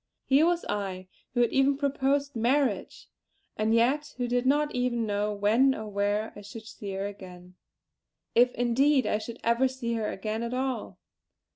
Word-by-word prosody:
Here 285 Hz, +5 st, +4 dB
was 345 Hz, 0 st, 0 dB
I, 190 Hz, -3 st, -4 dB, 0.3 s
who 245 Hz, -, +3 dB
had 240 Hz, -, +2 dB
even 270 Hz, +1 st, +3 dB
proposed 280 Hz, 0 st, 0 dB
marriage; 245 Hz, -2 st, 0 dB, 0.5 s
and 215 Hz, +1 st, 0 dB
yet 260 Hz, +6 st, +2 dB
who 245 Hz, -1 st, -1 dB
did 245 Hz, +1 st, 0 dB
not 295 Hz, +2 st, +2 dB
even 245 Hz, -2 st, 0 dB
know 205 Hz, 0 st, -1 dB
when 220 Hz, +7 st, +3 dB
or 220 Hz, -, -6 dB
where 205 Hz, +2 st, -1 dB
I 205 Hz, -, -9 dB
should 210 Hz, +2 st, -10 dB
see 205 Hz, -3 st, -7 dB
her 195 Hz, +1 st, -3 dB
again 180 Hz, -3 st, -10 dB, 0.8 s
if 245 Hz, +1 st, +5 dB
indeed 260 Hz, +4 st, +3 dB
I 210 Hz, -, 0 dB
should 230 Hz, +2 st, -7 dB
ever 235 Hz, +3 st, +3 dB
see 255 Hz, -2 st, -4 dB
her 220 Hz, -2 st, -1 dB
again 215 Hz, +3 st, -4 dB
at 235 Hz, +1 st, -3 dB
all. 260 Hz, -1 st, -3 dB
235 Hz, 170 wpm, -28 LUFS, 210-265 Hz, 0.8 s, if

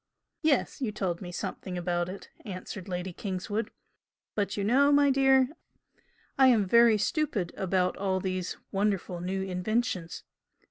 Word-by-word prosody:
"Yes, 300 Hz, -3 st, +1 dB
you 235 Hz, -5 st, 0 dB
told 180 Hz, -4 st, -2 dB
me 175 Hz, -2 st, -6 dB
something 185 Hz, 0 st, -5 dB
about 175 Hz, 0 st, -1 dB
it" 195 Hz, -, -9 dB
answered 185 Hz, -1 st, -7 dB
Lady 180 Hz, 0 st, -3 dB
Kingswood 205 Hz, +4 st, -3 dB, 0.6 s
"But 205 Hz, -1 st, -1 dB
you 200 Hz, -, -1 dB
know, 270 Hz, +7 st, +4 dB
my 285 Hz, -1 st, +5 dB
dear, 265 Hz, -1 st, +4 dB, 0.9 s
I 265 Hz, -, +8 dB
am 225 Hz, -6 st, +4 dB
very 235 Hz, +2 st, +6 dB
stupid 215 Hz, -, -1 dB
about 185 Hz, -1 st, 0 dB
all 190 Hz, -1 st, 0 dB
these 185 Hz, -1 st, -3 dB
wonderful 195 Hz, -3 st, -1 dB
new 190 Hz, +2 st, -2 dB
inventions. 190 Hz, -1 st, -2 dB
195 Hz, 140 wpm, -29 LUFS, 180-235 Hz, 0.9 s, I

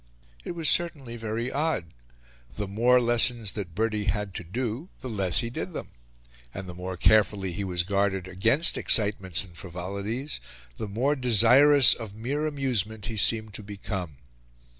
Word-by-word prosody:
It -, -, -6 dB
was 165 Hz, -2 st, -2 dB
certainly 145 Hz, -9 st, +1 dB
very 115 Hz, +2 st, -4 dB
odd: 140 Hz, -, -2 dB, 0.6 s
the 105 Hz, -1 st, -4 dB
more 120 Hz, +6 st, +3 dB
lessons 120 Hz, -2 st, +2 dB
that 95 Hz, -7 st, -7 dB
Bertie 110 Hz, 0 st, -1 dB
had 100 Hz, 0 st, -2 dB
to 85 Hz, -, -6 dB
do, 120 Hz, -, -5 dB
the -, -, -6 dB
less 100 Hz, -7 st, +3 dB
he 115 Hz, -1 st, -5 dB
did -, -, -6 dB
them; -, -, -7 dB, 0.7 s
and 95 Hz, -1 st, -7 dB
the 90 Hz, -, -8 dB
more 90 Hz, +1 st, -7 dB
carefully 100 Hz, -1 st, +2 dB
he 95 Hz, +4 st, -4 dB
was 90 Hz, -2 st, -1 dB
guarded 95 Hz, -1 st, -1 dB
against 115 Hz, -, +2 dB
excitements 100 Hz, -6 st, +2 dB
and 90 Hz, -4 st, -16 dB
frivolities, 100 Hz, -, -6 dB, 0.4 s
the 110 Hz, -, -5 dB
more 125 Hz, +9 st, -1 dB
desirous 130 Hz, +2 st, +6 dB
of 110 Hz, -4 st, -9 dB
mere 140 Hz, +8 st, -3 dB
amusement 115 Hz, -8 st, -2 dB
he 110 Hz, -, -5 dB
seemed 110 Hz, 0 st, +2 dB
to 105 Hz, -, -6 dB
become. 100 Hz, -5 st, -7 dB
110 Hz, 160 wpm, -26 LUFS, 95-125 Hz, 0.7 s, desirous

